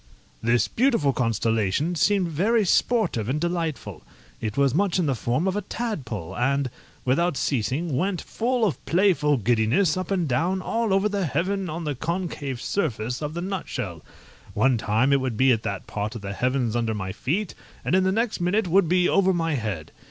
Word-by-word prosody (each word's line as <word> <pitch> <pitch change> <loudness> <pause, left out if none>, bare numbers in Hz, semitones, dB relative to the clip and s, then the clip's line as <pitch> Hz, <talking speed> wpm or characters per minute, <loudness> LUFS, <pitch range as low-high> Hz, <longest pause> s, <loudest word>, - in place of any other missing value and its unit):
This 115 +1 +2
beautiful 230 - +2
constellation 115 - 0
seemed 180 +4 +2
very 205 +8 +2
sportive 175 - +1
and 145 +4 0
delightful. 170 -3 -3 0.4
It 110 +1 -3
was 140 -2 +3
much 190 +3 +2
in 180 - +1
the 140 - +1
form 125 - -1
of 190 - 0
a 205 - 0
tadpole! 165 - -4
and, 135 +1 0 0.3
without 145 +5 +2
ceasing, 135 +5 -1
went, 185 +4 0
full 240 0 0
of 190 - -2
playful 170 -5 +3
giddiness, 120 - +2
up 185 -1 -3
and 185 -5 0
down, 170 +9 +1
all 225 +3 -1
over 195 +2 +3
the 200 -4 -1
heaven 185 +6 -1
on 165 +2 -4
the 150 -2 -1
concave 155 -4 -3
surface 125 - -2
of 150 +1 -4
the 170 - -3
nutshell. 125 - -4 0.5
One 130 -3 +3
time 110 +6 +2
it 140 - +3
would 125 -4 -2
be 130 +2 +5
at 115 -3 +2
that 100 -4 -4
part 105 +2 -4
of 115 - -6
the 100 0 -4
heavens 125 0 0
under 115 -2 0
my 95 -2 -4
feet, 160 - -2 0.3
and 130 - 0
in 185 0 +4
the 190 - +2
next 220 -1 -1
minute 185 +3 +1
would 175 -1 +3
be 180 0 +3
over 190 -1 +3
my 165 -2 0
head. 105 - -3
150 Hz, 190 wpm, -25 LUFS, 120-185 Hz, 0.5 s, be